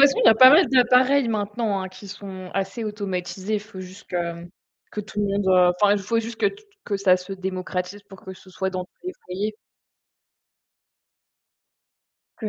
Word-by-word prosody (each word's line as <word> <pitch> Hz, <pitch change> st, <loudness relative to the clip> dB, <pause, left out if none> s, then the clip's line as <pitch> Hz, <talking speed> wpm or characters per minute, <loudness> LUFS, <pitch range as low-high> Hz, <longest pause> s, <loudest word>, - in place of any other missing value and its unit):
façon, 275 Hz, -, -1 dB
il -, -, +4 dB
y -, -, +10 dB
a -, -, +5 dB
pas 255 Hz, +3 st, +9 dB
mal 330 Hz, +5 st, +6 dB
d'appareils 255 Hz, +1 st, +4 dB
maintenant, 210 Hz, -1 st, -2 dB
hein, 190 Hz, -, -5 dB
qui 190 Hz, +2 st, -13 dB
sont 190 Hz, -2 st, -9 dB
assez 195 Hz, +4 st, -3 dB
automatisés. 200 Hz, -1 st, -4 dB
Il 210 Hz, -, 0 dB
faut 205 Hz, -2 st, -11 dB
juste 185 Hz, +2 st, -11 dB
que 170 Hz, -1 st, -3 dB, 0.5 s
que 210 Hz, -, -3 dB
tout 210 Hz, 0 st, -6 dB
le 205 Hz, -, +1 dB
monde, 200 Hz, 0 st, -1 dB
heu, 180 Hz, -1 st, +5 dB
enfin, 205 Hz, -1 st, +5 dB
il -, -, 0 dB
faut 230 Hz, +4 st, 0 dB
juste 230 Hz, 0 st, -4 dB
que -, -, +4 dB
t 400 Hz, -, -2 dB
t 425 Hz, -, -18 dB, 0.2 s
que 200 Hz, -, -2 dB
ça 195 Hz, -2 st, +4 dB
se 180 Hz, +2 st, -9 dB
démocratise 185 Hz, +1 st, -4 dB
pour 195 Hz, -2 st, -13 dB
que 190 Hz, -, -7 dB
ce 185 Hz, 0 st, -17 dB
soit 190 Hz, +1 st, -3 dB
dans 185 Hz, -1 st, -4 dB
tous 360 Hz, -, -18 dB
les 365 Hz, -, -3 dB
foyers. 200 Hz, +4 st, -3 dB, 2.8 s
Que 220 Hz, -, -5 dB
ça -, -, 0 dB
200 Hz, 205 wpm, -23 LUFS, 185-220 Hz, 2.8 s, y